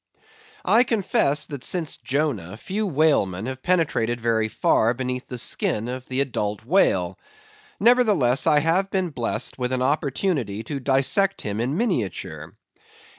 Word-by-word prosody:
I 230 +3 +5
confess, 185 - +1
that 140 -3 -8
since 170 -4 -1
Jonah, 125 - -2
few 205 - -3
whalemen 135 - +1
have 130 0 -5
penetrated 150 -10 0
very 115 -1 +1
far 115 +2 +2
beneath 125 0 -4
the 125 - -6
skin 115 -1 0
of 130 +1 -6
the 130 +1 -1
adult 105 -5 -3
whale; 95 - +2 0.6
nevertheless, 210 - +3
I 150 -1 +5
have 175 +5 +1
been 185 -3 -1
blessed 120 0 -3
with 125 0 -2
an 130 0 0
opportunity 140 - -1
to 140 +5 -5
dissect 135 +9 +1
him 105 0 -4
in 130 +7 -1
miniature. 175 - -3
135 Hz, 140 wpm, -23 LUFS, 115-165 Hz, 0.6 s, I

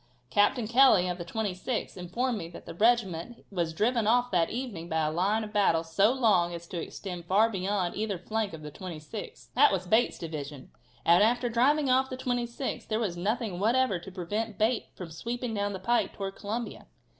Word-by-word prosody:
Captain 210 - +3
Kelly, 240 -6 +6
of 180 0 -3
the - - -3
26th, 210 +4 -3
informed 235 +8 -2
me 175 -6 -5
that 170 - -11
the - - -7
regiment 220 0 +1
was 170 -4 -1
driven 225 +6 +1
off 245 +2 +3
that 175 -3 +2
evening 225 -9 -5
by 160 -1 +1
a 155 - 0
line 200 +7 +1
of 210 0 -8
battle 180 -6 +3
so 195 +7 +3
long 200 -10 +2
as 170 0 -8
to 170 0 -5
extend 180 0 -7
far 210 +5 +3
beyond 190 -2 -1
either 210 -2 -2
flank 215 +4 -2
of 160 -1 -9
the 150 - -7
26th. 180 +4 -8
That 285 +4 +6
was 185 -2 -1
Bate's 220 +6 +2
division, 150 -4 -7 0.3
and 170 +2 +6
after 240 +3 +3
driving 275 +5 +3
off 260 +1 +3
the 255 - -5
26th 245 0 -3
there 215 - 0
was 200 -7 -1
nothing 200 +1 -2
whatever 225 -2 +2
to 190 +3 -10
prevent 205 +4 -3
Bate 225 +3 +1
from 175 -3 -8
sweeping 235 +7 -4
down 205 -1 -1
the 190 - -5
pike 235 +5 +1
towards 195 -1 -6
Columbia. 225 +3 -4
205 Hz, 195 wpm, -29 LUFS, 175-235 Hz, 0.3 s, Kelly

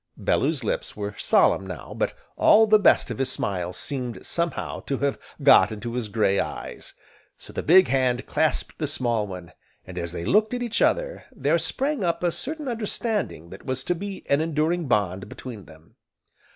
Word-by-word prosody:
Bellew's 145 -2 +1
lips 105 - -3
were 100 0 -4
solemn 95 - +3
now, 90 -6 -7
but - - -1 0.2
all 220 +1 +6
the 215 0 +5
best 195 - +4
of 115 - -5
his 130 -1 +1
smile 90 -6 -2
seemed, 125 +4 -3
somehow, 170 -3 -2
to 135 - -3
have 140 0 -1 0.2
got 135 - +7
into 115 +2 -5
his 120 -3 -2
gray 100 -2 +1
eyes. - - -5 0.4
So - - -11
the - - -2
big 185 +4 +6
hand 130 -2 +1
clasped - - 0
the - - -1
small 115 -4 0
one, 90 -3 -8 0.3
and 90 -1 -7
as 85 -1 -3
they 85 -1 -5
looked 215 - +3
at 245 - -3
each 235 -1 -1
other, - - +1
there - - +1
sprang 275 -4 -1
up 170 0 -1
a 175 - +2
certain 300 - -3
understanding 215 - -2
that 95 - -11
was 130 0 -1
to 175 - 0
be 195 +2 -7
an 140 +2 +3
enduring 160 +1 0
bond 100 -3 0
between 115 -7 -9
them. 80 +1 -18
130 Hz, 185 wpm, -25 LUFS, -, 0.4 s, got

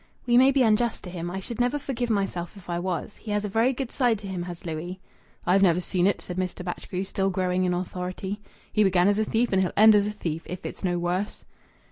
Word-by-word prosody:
"We 240 -1 +3
may 260 +2 +7
be 275 -1 +4
unjust 225 +1 +2
to 180 - -7
him. 175 -1 -4
I 190 +2 -4
should 235 +5 -6
never 250 +4 +2
forgive 250 -4 -3
myself 195 -3 -1
if 175 -2 -8
I 170 - -1
was. 180 +2 -3
He 220 - -10
has 210 0 0
a - - -1
very 225 +5 +2
good 265 -1 -4
side 245 -4 +2
to 200 0 -8
him, 185 -2 -3
has 175 0 -7
Louis!" 170 +3 -4 0.5
"I've 190 +2 +4
never 180 -3 +5
seen 180 0 +1
it," 200 - +1
said 180 - -7
Mr. 180 -1 -3
Batchgrew, 180 +1 -4
still 195 0 -1
growing 185 -1 0
in 180 - +1
authority. 185 +3 -4 0.3
"He 215 - +4
began 185 -2 +4
as 205 +1 +3
a 220 - +2
thief 230 0 +1
and 190 - +4
he'll 185 - 0
end 215 +1 +8
as 205 -1 +4
a - - -1
thief, 165 -6 -4
if 180 0 -7
it's - - -7
no 175 -2 +1
worse." 180 +4 -2
190 Hz, 250 wpm, -26 LUFS, 180-215 Hz, 0.5 s, end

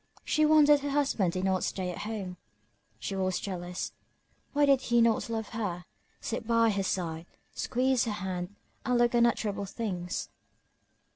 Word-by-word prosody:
She 305 0 +3
wondered 295 -1 +6
her 285 +1 -3
husband 275 -11 +1
did 185 - -2
not 190 -1 +1
stay 185 -2 -2
at 175 - -7
home. 205 -4 -5 0.6
She 155 - -4
was 185 -1 0
jealous 180 -2 -4 0.6
why 290 0 +3
did 275 -2 +4
he 240 -2 +2
not 230 0 +3
love 225 -1 -3
her, 185 -6 -3 0.3
sit 225 -1 -4
by 230 -1 +4
her 200 -1 0
side, 170 -3 -2 0.3
squeeze 260 0 +1
her 220 - -1
hand, 185 0 -4 0.3
and 250 -1 +1
look 240 0 +3
unutterable 225 -4 +2
things? 185 -4 -4
215 Hz, 155 wpm, -29 LUFS, 185-240 Hz, 0.6 s, wondered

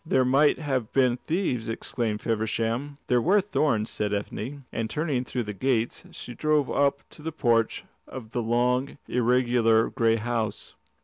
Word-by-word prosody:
"There 130 -5 +2
might 140 +4 +4
have 135 -7 -2
been 125 -2 +3
thieves," 130 - -2
exclaimed 115 -1 -2
Feversham. 115 +5 -1
"There 125 -2 +2
were 195 - +4
thorns," 140 - 0
said 105 -1 -2
Ethne, 125 +7 -5
and 115 -1 -3
turning 145 -1 -1
through 125 -1 -2
the 105 -1 -5
gates 120 +1 -1
she 120 - -9
drove 150 +1 +1
up 140 -1 +1
to - - -14
the 160 +2 -4
porch 120 -7 +1 0.2
of 115 -4 -9
the 120 - -1
long, 125 +4 0
irregular 120 -2 +3
grey 115 -1 +2
house. 115 -2 -3
125 Hz, 160 wpm, -26 LUFS, 115-140 Hz, 0.2 s, might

